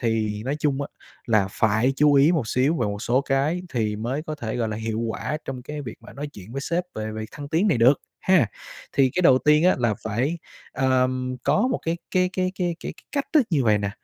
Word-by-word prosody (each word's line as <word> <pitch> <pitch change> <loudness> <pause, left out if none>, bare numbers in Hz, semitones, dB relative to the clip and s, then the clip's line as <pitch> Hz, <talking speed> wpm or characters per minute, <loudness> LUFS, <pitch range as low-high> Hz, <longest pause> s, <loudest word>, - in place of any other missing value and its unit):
thì 110 -3 -1
nói 140 +3 -1
chung 140 -2 0
á - - -5 0.4
là 110 -5 +3
phải 110 +6 +2
chú 150 0 +5
ý 140 +4 +6
một 145 -10 0
xíu 135 +8 +2
về 120 - 0
một 100 +1 -4
số 125 +3 +2
cái 140 +6 0
thì 110 -4 -1
mới 125 +8 -3
có 155 -1 -5
thể, 115 -7 -4
gọi 115 -2 0
là, 105 - -3
hiệu 110 0 -3
quả 115 +6 -2
trong 130 -2 -6
cái 150 +3 -6
việc 120 -5 -7
mà - - -13
nói 145 +2 -5
chuyện 100 +3 -11
với 140 - -3
sếp 170 +5 -1
về 110 0 -4
việc 110 0 -5
thăng 145 -1 -8
tiến 175 +8 +2
này 150 - +2
được, 125 +4 +5 0.2
ha. 185 -9 +4 0.5
Thì 135 -1 +3
cái 180 - +1
đầu 130 -7 +6
tiên 150 +3 +4
á 185 - +5
là 120 -3 +1
phải, 125 +10 -1 0.3
àm, 130 -1 +1
có 240 +5 +3
một 255 - 0
cái 165 +1 0
cái 180 0 +2
cái 185 0 -1
cái 175 -2 -1
cái - - -5
cái - - -19
cách 280 -2 -1
thức 300 -7 +4
như 145 -7 +2
vầy 105 -2 +4
nè, 100 -1 -2
130 Hz, 250 wpm, -24 LUFS, 115-155 Hz, 0.5 s, ý